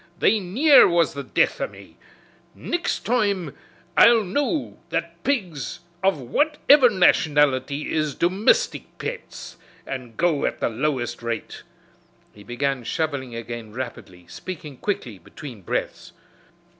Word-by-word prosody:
They 215 Hz, +4 st, +3 dB
near 255 Hz, -, +6 dB
was 170 Hz, -1 st, +2 dB
the 140 Hz, -, -5 dB
death -, -, 0 dB
o' -, -, 0 dB
me. -, -, -15 dB, 0.6 s
Nixt 345 Hz, 0 st, -3 dB
toime 200 Hz, -, 0 dB, 0.4 s
I'll 230 Hz, +3 st, +7 dB
know 285 Hz, -, -2 dB
that 170 Hz, +1 st, -4 dB
pigs 185 Hz, -, -2 dB, 0.2 s
of 195 Hz, -3 st, +2 dB
whaiver 285 Hz, -, +4 dB
nationality 150 Hz, -, +2 dB
is 155 Hz, -3 st, 0 dB
domistic 205 Hz, -, +2 dB
pets -, -, -7 dB, 0.3 s
an' 125 Hz, -4 st, -7 dB
go 165 Hz, -1 st, +1 dB
at -, -, -4 dB
the -, -, 0 dB
lowest 125 Hz, 0 st, -2 dB
rate." 115 Hz, -1 st, -5 dB, 0.7 s
He 105 Hz, -, -14 dB
began 130 Hz, +2 st, -2 dB
shoveling 135 Hz, -3 st, -3 dB
again 115 Hz, -2 st, -7 dB
rapidly, 110 Hz, -8 st, -7 dB
speaking 150 Hz, -, -8 dB
quickly 125 Hz, -, -3 dB
between 125 Hz, -, -11 dB
breaths. 85 Hz, -, -4 dB
155 Hz, 120 wpm, -23 LUFS, 125-200 Hz, 0.7 s, I'll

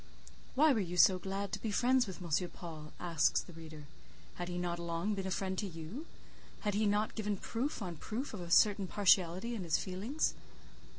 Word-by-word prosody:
"Why 300 Hz, +2 st, +6 dB
were 225 Hz, -, +1 dB
you 180 Hz, -3 st, -3 dB
so 185 Hz, +2 st, +7 dB
glad 195 Hz, +2 st, -3 dB
to 205 Hz, -, -3 dB
be 225 Hz, -, -2 dB
friends 245 Hz, +3 st, +3 dB
with 185 Hz, -1 st, -7 dB
M. 170 Hz, +2 st, 0 dB
Paul?" 155 Hz, -3 st, -9 dB
asks 170 Hz, -3 st, +2 dB
the 175 Hz, -, -12 dB
reader. 155 Hz, -2 st, -10 dB, 0.5 s
"Had 175 Hz, 0 st, -5 dB
he 175 Hz, -, -3 dB
not 175 Hz, -1 st, -2 dB
long 170 Hz, +4 st, -1 dB
been 195 Hz, -1 st, -3 dB
a -, -, -2 dB
friend 190 Hz, 0 st, -1 dB
to 205 Hz, -, -2 dB
you? 175 Hz, -, -7 dB, 0.5 s
Had 205 Hz, -1 st, 0 dB
he 210 Hz, +1 st, +2 dB
not 210 Hz, +1 st, +1 dB
given 210 Hz, -2 st, -2 dB
proof 235 Hz, +4 st, -3 dB
on 175 Hz, -3 st, -5 dB
proof 235 Hz, -, -4 dB
of 205 Hz, -, -5 dB
a 170 Hz, -, -7 dB
certain 200 Hz, +2 st, +5 dB
partiality 190 Hz, +3 st, +3 dB
in 215 Hz, -5 st, -3 dB
his 165 Hz, -2 st, +2 dB
feelings?" 205 Hz, +11 st, -1 dB
190 Hz, 200 wpm, -34 LUFS, 175-215 Hz, 0.5 s, so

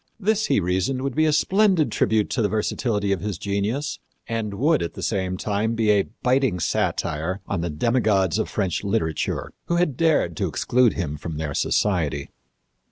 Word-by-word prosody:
This, 220 Hz, +1 st, +1 dB
he -, -, +3 dB
reasoned, 95 Hz, +9 st, 0 dB
would 135 Hz, -2 st, -2 dB
be 155 Hz, +3 st, +3 dB
a -, -, +3 dB
splendid 185 Hz, -, +3 dB
tribute 105 Hz, 0 st, +1 dB
to 125 Hz, -, 0 dB
the 105 Hz, -, +2 dB
versatility 105 Hz, 0 st, -1 dB
of 95 Hz, -, 0 dB
his 105 Hz, -4 st, -3 dB
genius 110 Hz, -, -2 dB, 0.3 s
and 110 Hz, -3 st, -3 dB
would, 150 Hz, +7 st, +2 dB
at 85 Hz, -, -4 dB
the -, -, -6 dB
same 95 Hz, -3 st, -1 dB
time, 105 Hz, +4 st, -1 dB
be 110 Hz, -2 st, +3 dB
a 100 Hz, -2 st, +2 dB, 0.2 s
biting 125 Hz, -7 st, +2 dB
satire 80 Hz, +3 st, -1 dB
on 95 Hz, -4 st, -2 dB
the 85 Hz, -, -2 dB
demigods 100 Hz, 0 st, +1 dB
of -, -, -1 dB
French 95 Hz, -3 st, -1 dB
literature 100 Hz, -6 st, -1 dB
who 170 Hz, -, 0 dB
had 170 Hz, -6 st, +1 dB
dared 155 Hz, -, +2 dB
to -, -, 0 dB
exclude 125 Hz, -2 st, +2 dB
him 75 Hz, -4 st, -3 dB
from 80 Hz, +1 st, -6 dB
their 75 Hz, -2 st, -3 dB
society. 80 Hz, -6 st, 0 dB
105 Hz, 180 wpm, -23 LUFS, 90-130 Hz, 0.3 s, he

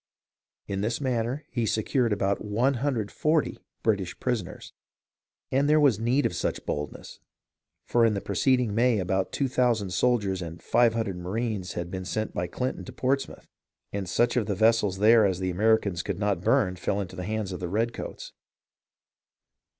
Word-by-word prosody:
In 100 Hz, -1 st, -3 dB
this 115 Hz, +3 st, -1 dB
manner 130 Hz, +1 st, -1 dB
he 120 Hz, -3 st, -1 dB
secured 115 Hz, +3 st, +1 dB
about 100 Hz, -1 st, 0 dB
140 125 Hz, +5 st, 0 dB, 0.2 s
British 100 Hz, -5 st, 0 dB
prisoners. 105 Hz, -7 st, -3 dB, 0.8 s
And 140 Hz, +2 st, +2 dB
there 155 Hz, +1 st, +5 dB
was 135 Hz, -8 st, +4 dB
need 125 Hz, +5 st, +2 dB
of -, -, 0 dB
such -, -, -2 dB
boldness, 75 Hz, -1 st, -5 dB, 0.7 s
for 120 Hz, -, +2 dB
in 110 Hz, -2 st, +3 dB
the -, -, -1 dB
pre -, -, -5 dB
ceding 125 Hz, -5 st, +2 dB
May 120 Hz, +1 st, +3 dB
about 95 Hz, 0 st, -1 dB
2000 125 Hz, -7 st, +1 dB
soldiers 100 Hz, -1 st, +1 dB
and 85 Hz, -1 st, -7 dB
500 115 Hz, -2 st, +2 dB
marines 95 Hz, +2 st, -3 dB
had 85 Hz, 0 st, -5 dB
been 95 Hz, -1 st, -5 dB
sent 110 Hz, +3 st, -3 dB
by 90 Hz, -, -2 dB
Clinton 125 Hz, +9 st, -3 dB
to -, -, -8 dB
Portsmouth, 135 Hz, +1 st, -2 dB, 0.5 s
and 100 Hz, -3 st, -3 dB
such 120 Hz, +7 st, +2 dB
of 115 Hz, -4 st, +1 dB
the 100 Hz, -, -1 dB
vessels 110 Hz, -2 st, +3 dB
there 110 Hz, +2 st, +6 dB
as 95 Hz, -3 st, +2 dB
the 95 Hz, 0 st, -2 dB
Americans 100 Hz, -2 st, +2 dB
could 100 Hz, 0 st, -4 dB
not 100 Hz, -3 st, 0 dB
burn 90 Hz, 0 st, +2 dB
fell 95 Hz, +2 st, -1 dB
into 95 Hz, -2 st, -5 dB
the 90 Hz, -1 st, -5 dB
hands 110 Hz, -2 st, -2 dB
of 90 Hz, -, -5 dB
the 90 Hz, -, -4 dB
redcoats. 115 Hz, +5 st, -3 dB
110 Hz, 165 wpm, -27 LUFS, 95-120 Hz, 0.8 s, there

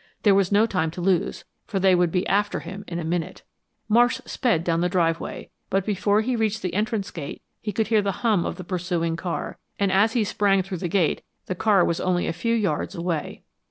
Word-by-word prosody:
There 205 Hz, -, +6 dB
was 195 Hz, -1 st, +2 dB
no 205 Hz, +2 st, +5 dB
time 180 Hz, -7 st, 0 dB
to -, -, -3 dB
lose, 180 Hz, 0 st, 0 dB, 0.2 s
for 200 Hz, -4 st, -1 dB
they 190 Hz, 0 st, +4 dB
would 175 Hz, -2 st, +3 dB
be 180 Hz, +2 st, 0 dB
after 205 Hz, +1 st, +1 dB
him 200 Hz, +1 st, -8 dB
in 170 Hz, -, -4 dB
a 170 Hz, -, -3 dB
minute. 175 Hz, +2 st, -3 dB, 0.4 s
Marsh 240 Hz, +4 st, +4 dB
sped 230 Hz, -, 0 dB
down 170 Hz, -1 st, +1 dB
the 180 Hz, -, +1 dB
driveway, 165 Hz, -2 st, -1 dB, 0.2 s
but 195 Hz, -1 st, 0 dB
before 205 Hz, 0 st, +2 dB
he 250 Hz, +3 st, -1 dB
reached 220 Hz, -1 st, -1 dB
the 180 Hz, -2 st, -2 dB
entrance 210 Hz, 0 st, -1 dB
gate 145 Hz, -4 st, -7 dB, 0.2 s
he 210 Hz, -, -3 dB
could 215 Hz, +2 st, -1 dB
hear 220 Hz, -2 st, +4 dB
the 200 Hz, -1 st, 0 dB
hum 210 Hz, -7 st, +3 dB
of -, -, -3 dB
the 185 Hz, -, -8 dB
pursuing 170 Hz, -2 st, -1 dB
car, 170 Hz, +1 st, -4 dB, 0.2 s
and 200 Hz, -1 st, +1 dB
as 205 Hz, +4 st, +3 dB
he 235 Hz, -, +2 dB
sprang 200 Hz, -2 st, +2 dB
through 190 Hz, 0 st, -5 dB
the 175 Hz, -, -2 dB
gate 175 Hz, -2 st, +1 dB, 0.2 s
the -, -, -2 dB
car 195 Hz, +1 st, +3 dB
was 170 Hz, -, 0 dB
only 180 Hz, -1 st, +1 dB
a -, -, -1 dB
few 230 Hz, +7 st, 0 dB
yards 195 Hz, -4 st, -1 dB
away. 170 Hz, -2 st, -3 dB
190 Hz, 225 wpm, -24 LUFS, 175-210 Hz, 0.4 s, There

